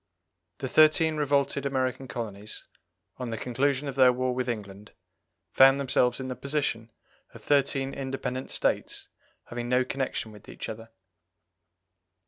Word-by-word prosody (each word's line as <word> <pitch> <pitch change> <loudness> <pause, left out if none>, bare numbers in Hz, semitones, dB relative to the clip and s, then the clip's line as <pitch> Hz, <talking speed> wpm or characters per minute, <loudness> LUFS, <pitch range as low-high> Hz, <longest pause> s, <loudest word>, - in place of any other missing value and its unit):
The 135 - -4
thirteen 155 +2 +4
revolted 140 -1 +1
American 130 -1 -1
colonies, 105 -3 -7 0.5
on 125 -2 -5
the 115 - -3
conclusion 135 +4 0
of 140 - -3
their 130 -2 +6
war 130 0 -1
with 125 0 -2
England, 105 -2 -6 0.6
found 135 +1 +6
themselves 125 -2 +2
in 130 - -4
the 130 - -4
position 135 -4 -2 0.5
of - - -12
thirteen 135 -1 +1
independent 130 -1 -4
States - - -1 0.3
having 120 0 -6
no 125 0 +3
connection 130 -4 -3
with 105 0 -15
each - - -7
other. 115 +1 -8
130 Hz, 135 wpm, -27 LUFS, 120-140 Hz, 0.6 s, their